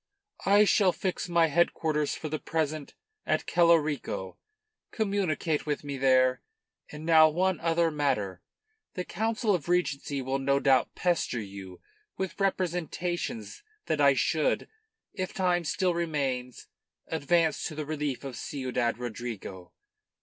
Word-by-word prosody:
"I 205 Hz, +2 st, +6 dB
shall 195 Hz, -2 st, +4 dB
fix 185 Hz, -1 st, -3 dB
my 170 Hz, -1 st, +4 dB
headquarters 155 Hz, -2 st, +1 dB
for 155 Hz, -, -5 dB
the 155 Hz, 0 st, -3 dB
present 155 Hz, -2 st, -3 dB, 0.3 s
at -, -, 0 dB
Celorico. 155 Hz, -, +1 dB, 0.5 s
Communicate 185 Hz, -8 st, -1 dB
with 150 Hz, 0 st, -2 dB
me 140 Hz, -1 st, -4 dB
there. 130 Hz, -1 st, +4 dB, 0.5 s
And 150 Hz, +1 st, -8 dB
now 160 Hz, -1 st, +7 dB
one 180 Hz, +2 st, 0 dB
other 165 Hz, 0 st, +2 dB
matter: 105 Hz, -, -1 dB, 0.5 s
the 180 Hz, -, -2 dB
Council 220 Hz, +1 st, 0 dB
of 175 Hz, -2 st, -2 dB
Regency 145 Hz, -5 st, 0 dB
will 135 Hz, +1 st, -1 dB
no 140 Hz, +1 st, +2 dB
doubt 135 Hz, -2 st, +2 dB
pester 175 Hz, -8 st, 0 dB
you 95 Hz, -3 st, -9 dB, 0.4 s
with 190 Hz, +1 st, -4 dB
representations 175 Hz, -, -2 dB, 0.2 s
that 155 Hz, -2 st, 0 dB
I 140 Hz, -1 st, +6 dB
should 155 Hz, +3 st, +1 dB, 0.5 s
if 185 Hz, -2 st, -4 dB
time 180 Hz, -2 st, +1 dB
still 180 Hz, +3 st, 0 dB
remains 140 Hz, -7 st, -2 dB, 0.4 s
advance 160 Hz, 0 st, +1 dB
to 155 Hz, -, -7 dB
the 155 Hz, 0 st, -4 dB
relief 150 Hz, -3 st, -3 dB
of 135 Hz, -3 st, -6 dB
Ciudad 125 Hz, -4 st, -2 dB
Rodrigo. 115 Hz, -6 st, -6 dB
155 Hz, 130 wpm, -28 LUFS, 135-175 Hz, 0.5 s, now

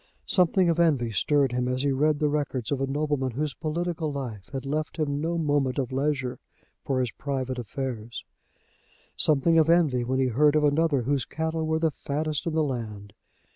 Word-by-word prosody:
Something 180 Hz, 0 st, +3 dB
of 170 Hz, 0 st, +1 dB
envy 140 Hz, -9 st, +2 dB
stirred 135 Hz, +6 st, +2 dB
him 125 Hz, 0 st, -1 dB
as 130 Hz, +1 st, -1 dB
he 140 Hz, -, +2 dB
read 150 Hz, +3 st, +2 dB
the 150 Hz, 0 st, +1 dB
records 145 Hz, -5 st, -2 dB
of 140 Hz, -2 st, 0 dB
a 135 Hz, -, 0 dB
nobleman 145 Hz, -1 st, -1 dB
whose 145 Hz, +2 st, -2 dB
political 160 Hz, +1 st, -2 dB
life 120 Hz, -8 st, -6 dB
had 135 Hz, -1 st, -5 dB
left 155 Hz, +3 st, -3 dB
him 145 Hz, -2 st, -1 dB
no 170 Hz, +2 st, -1 dB
moment 145 Hz, -5 st, +1 dB
of 130 Hz, -3 st, -1 dB
leisure 135 Hz, -2 st, -1 dB, 0.4 s
for 135 Hz, -2 st, 0 dB
his 125 Hz, -3 st, -1 dB
private 130 Hz, 0 st, -3 dB
affairs; 120 Hz, -1 st, -5 dB, 0.9 s
something 160 Hz, +2 st, +4 dB
of 160 Hz, 0 st, +3 dB
envy 155 Hz, -8 st, +3 dB
when 130 Hz, +2 st, -1 dB
he 135 Hz, -, +3 dB
heard 145 Hz, +5 st, +3 dB
of 155 Hz, -, +3 dB
another 145 Hz, -2 st, +2 dB
whose 135 Hz, +1 st, 0 dB
cattle 160 Hz, 0 st, -2 dB
were 160 Hz, 0 st, +1 dB
the 160 Hz, -1 st, +1 dB
fattest 150 Hz, +2 st, -3 dB
in 165 Hz, -, -1 dB
the 160 Hz, -, +3 dB
land. 110 Hz, -7 st, -5 dB
145 Hz, 190 wpm, -26 LUFS, 130-155 Hz, 0.9 s, something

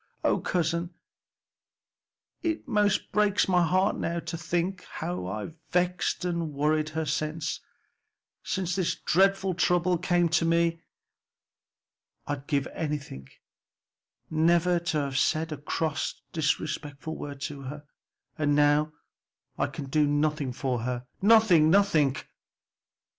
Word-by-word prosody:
O -, -, +2 dB
cousin, 170 Hz, 0 st, -1 dB, 1.5 s
it 325 Hz, -4 st, -2 dB
most 210 Hz, -4 st, +1 dB
breaks 210 Hz, -1 st, +2 dB
my 180 Hz, -2 st, +3 dB
heart 185 Hz, +4 st, +2 dB
now 170 Hz, 0 st, -2 dB
to -, -, -5 dB
think 175 Hz, +3 st, -2 dB
how 165 Hz, -, -4 dB
I've 105 Hz, -, -5 dB, 0.2 s
vexed 180 Hz, +1 st, 0 dB
and 170 Hz, -3 st, -2 dB
worried 155 Hz, +2 st, +1 dB
her 160 Hz, 0 st, -2 dB
since 155 Hz, +2 st, -2 dB, 0.8 s
since 180 Hz, -2 st, -2 dB
this 185 Hz, -3 st, 0 dB
dreadful 195 Hz, +1 st, +2 dB
trouble 175 Hz, 0 st, +2 dB
came 175 Hz, -1 st, +2 dB
to 165 Hz, -, +2 dB
me. 165 Hz, 0 st, +2 dB, 1.4 s
I'd 145 Hz, -1 st, -4 dB
give 140 Hz, -2 st, +1 dB
anything 145 Hz, -, -5 dB, 1.0 s
never 170 Hz, +2 st, +3 dB
to 170 Hz, -2 st, -2 dB
have 135 Hz, -1 st, -1 dB
said 160 Hz, +1 st, +1 dB
a 155 Hz, -, -3 dB
cross 155 Hz, +1 st, -2 dB
or -, -, -37 dB
disrespectful 155 Hz, 0 st, -2 dB
word 145 Hz, -1 st, -7 dB
to 140 Hz, -1 st, -5 dB
her. 145 Hz, +3 st, -7 dB, 0.6 s
And 145 Hz, -1 st, +2 dB
now 150 Hz, +1 st, +3 dB, 0.7 s
I -, -, +2 dB
can 145 Hz, -, -7 dB
do 150 Hz, +2 st, +2 dB
nothing 145 Hz, -1 st, 0 dB
for 125 Hz, -1 st, -2 dB
her! 125 Hz, +1 st, -3 dB, 0.2 s
nothing, 200 Hz, -7 st, +6 dB
nothing!" 165 Hz, -8 st, +4 dB
160 Hz, 125 wpm, -27 LUFS, 145-180 Hz, 1.5 s, nothing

